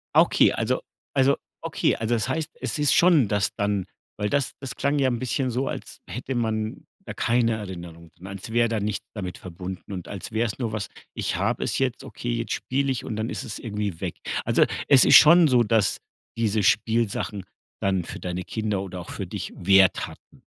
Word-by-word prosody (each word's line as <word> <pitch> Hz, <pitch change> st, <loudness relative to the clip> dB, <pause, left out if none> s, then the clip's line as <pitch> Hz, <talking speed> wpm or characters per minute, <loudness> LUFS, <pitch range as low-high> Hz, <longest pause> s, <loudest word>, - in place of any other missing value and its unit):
Ah -, -, +9 dB
okay, -, -, +4 dB
also -, -, -1 dB, 0.3 s
also 135 Hz, 0 st, +3 dB, 0.2 s
okay, -, -, +1 dB
also 115 Hz, +1 st, 0 dB
das 110 Hz, -4 st, -1 dB
heißt, 160 Hz, -1 st, -2 dB
es -, -, -2 dB
ist 145 Hz, -1 st, +4 dB
schon 170 Hz, -, +5 dB
das 105 Hz, 0 st, 0 dB
dann 100 Hz, -2 st, 0 dB, 0.3 s
weil 105 Hz, 0 st, -1 dB
das, 140 Hz, 0 st, 0 dB
das 135 Hz, -2 st, -6 dB
klang 140 Hz, +1 st, 0 dB
ja 135 Hz, -, +3 dB
ein 120 Hz, -, -1 dB
bisschen 130 Hz, +1 st, -1 dB
so, 125 Hz, +3 st, -1 dB
als -, -, -6 dB
hätte 125 Hz, +2 st, -5 dB
man 110 Hz, -2 st, -2 dB, 0.2 s
da -, -, -6 dB
keine 115 Hz, -1 st, +2 dB
Erinnerung, 85 Hz, -5 st, -8 dB
als 95 Hz, +3 st, -7 dB
wäre 120 Hz, 0 st, +3 dB
da 115 Hz, -1 st, 0 dB
nichts 105 Hz, 0 st, -3 dB
damit 95 Hz, -4 st, -5 dB
verbunden 95 Hz, +2 st, -7 dB
und 90 Hz, -3 st, -6 dB
als 100 Hz, +3 st, -7 dB
wäre 115 Hz, +1 st, +1 dB
es 105 Hz, 0 st, -4 dB
nur 115 Hz, -4 st, -2 dB
was, 105 Hz, -3 st, -3 dB, 0.3 s
ich -, -, -2 dB
habe -, -, 0 dB
es -, -, -1 dB
jetzt, 130 Hz, -1 st, -1 dB
okay 120 Hz, -2 st, -4 dB
jetzt 115 Hz, 0 st, -3 dB
spiele 135 Hz, +1 st, -1 dB
ich 130 Hz, -, -3 dB
und 110 Hz, -, -4 dB
dann 110 Hz, +2 st, -2 dB
ist -, -, -4 dB
es 110 Hz, -, -5 dB
irgendwie 105 Hz, -6 st, -4 dB
weg. -, -, -4 dB, 0.3 s
Also, -, -, +4 dB, 0.2 s
es 135 Hz, -3 st, +7 dB
ist 135 Hz, -, +7 dB
schon 170 Hz, +3 st, +9 dB
so, 125 Hz, -4 st, +4 dB
dass 110 Hz, -2 st, +2 dB, 0.4 s
diese 110 Hz, -2 st, +1 dB
Spielsachen 110 Hz, -2 st, +1 dB, 0.4 s
dann 95 Hz, -2 st, +1 dB
für -, -, -7 dB
deine 90 Hz, 0 st, -4 dB
Kinder 105 Hz, -2 st, -2 dB
oder 95 Hz, -2 st, -6 dB
auch 85 Hz, -, -11 dB
für -, -, -5 dB
dich -, -, -6 dB
Wert 95 Hz, 0 st, +4 dB
hatten. -, -, -16 dB
110 Hz, 205 wpm, -25 LUFS, 100-125 Hz, 0.4 s, Ah